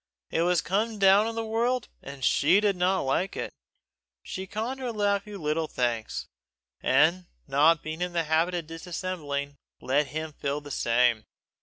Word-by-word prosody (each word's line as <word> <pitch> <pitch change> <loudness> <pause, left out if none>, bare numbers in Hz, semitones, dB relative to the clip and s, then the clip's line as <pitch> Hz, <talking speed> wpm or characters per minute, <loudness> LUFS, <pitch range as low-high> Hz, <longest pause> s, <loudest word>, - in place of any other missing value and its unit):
It 165 - +1
was 175 0 +3
a - - -18
come 215 +3 0
down 200 +2 +5
in 230 - -4
the 225 0 -2
world, 235 +2 0
and 140 -2 -6
she 165 +8 +4
did 205 -2 +2
not 185 +1 +2
like 155 +8 -1
it. - - -4 0.7
She 190 0 -6
conned 230 +7 -3
her 250 -2 -3
nephew 205 -1 -1
little 155 0 -1
thanks, 120 -5 -2 0.6
and 165 +7 +3 0.2
not 150 +4 +4
being 155 +2 -5
in 180 0 -1
the 170 -1 +1
habit 165 +3 +1
of 170 -2 -3
dissembling, 165 -4 -4 0.2
let 140 +2 +1
him 155 +2 -5
feel 140 0 -2
the 145 -1 -10
same. 120 -2 +2
170 Hz, 170 wpm, -27 LUFS, 145-200 Hz, 0.7 s, down